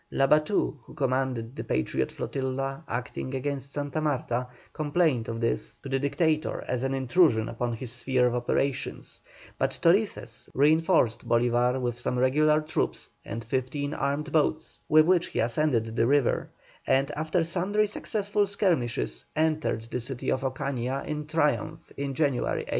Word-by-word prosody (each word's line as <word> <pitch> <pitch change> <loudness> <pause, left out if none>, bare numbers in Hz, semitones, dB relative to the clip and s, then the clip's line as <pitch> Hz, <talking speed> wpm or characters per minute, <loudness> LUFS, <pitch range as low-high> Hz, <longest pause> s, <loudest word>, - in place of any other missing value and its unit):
Labatut, 150 +3 +2
who - - -15
commanded 130 -3 -1
the - - -4
Patriot 65 0 -1
flotilla 135 +2 -3
acting 130 +1 -4
against 140 0 -3
Santa 145 +2 -3
Marta, 125 -4 -1 0.3
complained 150 -5 +1
of 115 0 -4
this 115 0 -1
to 135 - -6
the 135 0 +1
Dictator 155 +2 0
as 125 -1 -1
an 135 +1 0
intrusion 130 -4 +3
upon 120 +1 -2
his 120 +1 -5
sphere 125 +1 +1
of 120 - +2
operations; 125 +2 -2 0.4
but - - 0
Torices 170 - +1
reinforced 150 -4 +3
Bolívar 120 +2 +3
with 120 -1 -2
some 125 - -1
regular 150 +4 +3
troops 155 +1 -2
and 115 +2 -5
fifteen 130 +4 -2
armed 145 +2 -2
boats, 155 0 +1
with 155 0 +7
which 180 +1 +3
he - - -4
ascended 115 -2 +1
the 115 0 +3
river, 140 -1 +2 0.4
and 135 +2 +2
after 160 +3 0
sundry 185 +5 +1
successful 205 0 -1
skirmishes 120 - 0
entered 155 -7 +1
the 120 +2 -4
city 125 +1 -2
of 130 - 0
Ocaña 135 0 -2
in 150 0 -4
triumph 155 0 0
in 140 -1 -3
January, 140 -5 +1
1813. - - -10
135 Hz, 150 wpm, -27 LUFS, 125-155 Hz, 0.4 s, with